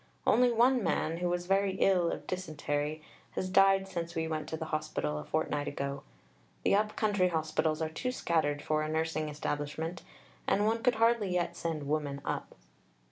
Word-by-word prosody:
Only 245 0 +5
one 245 +2 +4
man, 165 -1 0
who 175 0 -1
was 175 0 -1
very 195 +1 +2
ill 185 -3 +3
of - - -5
dysentery, 155 -3 -3 0.3
has 185 0 -3
died 195 0 +5
since 170 -2 -4
we 160 0 -1
went 155 -1 -3
to 160 - -3
the 160 - -4
hospital 155 - -1
a - - -6
fortnight 150 - -1
ago. 140 -1 -3 0.6
The - - +3
up 210 +1 +2
country 200 -4 +2
hospitals 160 -1 0
are 160 - -1
too 250 +10 -3
scattered 155 - 0
for 155 0 +1
a 155 - -2
nursing 155 -1 -1
establishment, 150 +3 -3 0.5
and 205 - +3
one 225 +1 +1
could 250 -2 +3
hardly 230 -3 +3
yet 175 -1 0
send 160 -4 -3
women 145 -2 -1
up." - - -3
165 Hz, 180 wpm, -31 LUFS, 155-195 Hz, 0.6 s, Only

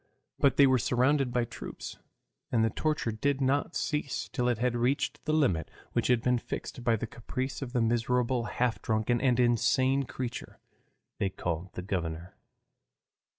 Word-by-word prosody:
But 135 -2 +3
they 140 - +8
were 130 -1 +4
surrounded 130 +3 +2
by 120 -1 +1
troops, 115 - -8 0.5
and 115 -2 +3
the 110 - 0
torture 155 -7 0
did 140 +6 0
not 140 +4 +1
cease 150 -3 -2
till 125 -3 -1
it 120 - +1
had 120 +1 0
reached 130 +4 0
the 155 - 0
limit 130 - +2 0.2
which - - +1
had 125 -2 +3
been 125 -1 +2
fixed 120 - -6
by 115 -1 +3
the 110 - -3
caprice 130 +4 -4
of 130 -3 -4
the 120 - +2
miserable 120 +1 +1
half 120 -6 -1
drunken 110 +2 +1
and 125 -2 +3
insane 130 +3 +3
creature 125 -1 -6 0.6
they 100 - +1
called 90 -1 -4
the 90 - -5
governor. 85 -3 -3
125 Hz, 165 wpm, -29 LUFS, 115-135 Hz, 0.6 s, they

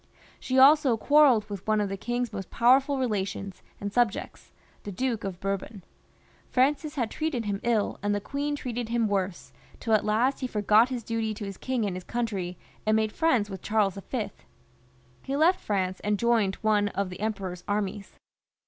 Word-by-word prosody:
She 260 - -1
also 275 -2 +6
quarrelled 270 -5 +5
with 200 -2 -7
one 215 0 +3
of 205 - 0
the 195 - -3
king's 240 +3 -3
most 195 -2 -6
powerful 265 +4 +4
relations 200 -5 -3 0.2
and 205 0 -5
subjects, 240 -4 -1 0.3
the 205 - -7
Duke 235 +2 -2
of 190 -3 -5
Bourbon. 195 0 -4 0.7
Francis 285 +3 +1
had 240 -6 -1
treated 300 -8 -2
him 200 -1 -2
lQ, 225 -3 0
and 205 0 0
the - - 0
queen 285 +7 -3
treated 245 -4 -4
him 235 -1 +1
worse, 195 -3 -2 0.3
till 225 - -1
at 215 - +4
last 235 +6 +1
he 255 - -2
forgot 215 +1 +4
his 250 -3 -4
duty 225 -1 -2
to 205 - -6
his 195 -1 -7
king 255 -4 -1
and 195 -3 -2
his 185 - -6
country, 195 -7 -3 0.3
and 215 0 +2
made 220 -1 +1
Mends 255 -11 +3
with 195 -2 -7
Charles 210 -3 +1
V. 240 -5 -2 0.9
He 270 - -3
left 335 +5 +4
France 185 -3 -1
and 210 0 0
joined 225 -4 +2
one 210 -1 +3
of 200 -1 -3
the 180 - -8
Emperor's 195 -4 -3
armies. 205 -1 -3
215 Hz, 185 wpm, -27 LUFS, 200-250 Hz, 0.9 s, also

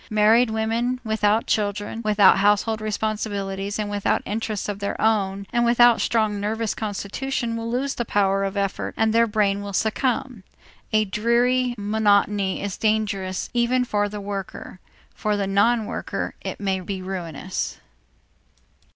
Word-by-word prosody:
Married 220 +3 +4
women 225 +3 -1
without 220 0 +1
children, 205 +1 -1
without 205 -3 +5
household 210 +2 +2
responsibilities, 205 -2 -3
and 210 -1 -2
without 205 -1 0
interests 215 -1 -3
of 205 -1 -4
their 200 - -3
own 200 -3 +1
and 240 -1 +2
without 240 0 +5
strong 215 -3 +1
nervous 220 +2 -1
constitution 230 +4 -3
will 230 0 -4
soon 245 +2 0
lose 275 0 -2
the 240 - -2
power 195 -3 +1
of 195 +1 -3
effort 200 -1 -2
and 220 0 +2
their 230 0 +4
brain 205 -2 +1
will 200 0 -6
succumb. 235 +2 -1 0.5
A 215 0 +3
dreary 240 +4 +1
monotony 205 -2 +1
is 200 -2 -4
dangerous 205 -4 -1
even 245 +1 +2
for 205 -3 0
the 210 0 -6
worker; 195 -2 -6 0.3
for 210 -1 -1
the 200 - 0
non 215 +4 +2
worker - - -4
it - - -5
may 195 -2 -1
be 185 0 -5
ruinous. 185 -1 -4
210 Hz, 150 wpm, -23 LUFS, 200-225 Hz, 0.5 s, without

